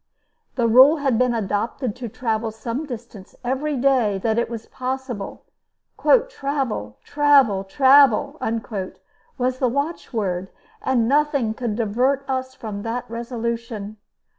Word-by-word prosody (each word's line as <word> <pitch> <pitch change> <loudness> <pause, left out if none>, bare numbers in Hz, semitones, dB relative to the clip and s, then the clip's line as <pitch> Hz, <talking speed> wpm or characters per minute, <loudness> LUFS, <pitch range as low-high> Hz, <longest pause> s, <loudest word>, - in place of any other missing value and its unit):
The 240 -3 +2
rule 260 +7 +7
had 270 -5 +1
been 250 -1 +2
adopted 220 +3 -2
to 245 -2 -5
travel 225 0 -2
some 230 +7 -5
distance 235 -6 -9
every 270 +4 -1
day 245 -6 +2
that 225 0 +2
it 235 - -1
was 230 -2 -6
possible. 255 -5 -5 0.8
"Travel, 270 - -3
travel, 280 -9 +4
travel," 275 +4 +4 1.0
was 255 0 -1
the 255 - +2
watchword, 225 - -2 0.3
and 245 -4 +1
nothing 280 -4 +2
could 230 -2 -3
divert 250 +5 0
us 260 -1 -3
from 210 -4 -6
that 230 +3 -4
resolution. 230 -3 -4
240 Hz, 120 wpm, -22 LUFS, 220-270 Hz, 1.0 s, rule